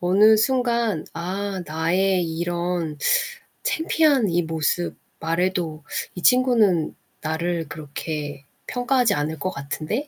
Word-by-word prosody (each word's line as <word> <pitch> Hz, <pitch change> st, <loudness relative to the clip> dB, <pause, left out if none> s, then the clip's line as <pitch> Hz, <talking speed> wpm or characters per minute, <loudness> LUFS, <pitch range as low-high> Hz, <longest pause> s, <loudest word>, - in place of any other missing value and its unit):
어느 205 Hz, +5 st, +6 dB
순간 235 Hz, -, +1 dB
'아 190 Hz, +3 st, -3 dB
나의 180 Hz, +4 st, +1 dB
이런 170 Hz, -1 st, -2 dB, 0.7 s
창피한 305 Hz, -, +2 dB
이 175 Hz, 0 st, +2 dB
모습 160 Hz, +2 st, 0 dB, 0.2 s
말해도 165 Hz, -1 st, -1 dB, 0.3 s
이 180 Hz, -, -6 dB
친구는 230 Hz, -10 st, +4 dB, 0.3 s
나를 165 Hz, +1 st, -2 dB
그렇게 145 Hz, -1 st, -5 dB, 0.2 s
평가하지 245 Hz, -2 st, +2 dB
않을 150 Hz, +2 st, -2 dB
것 185 Hz, -, -1 dB
같은데?' 155 Hz, -, -3 dB
175 Hz, 220 characters per minute, -23 LUFS, 160-215 Hz, 0.7 s, 어느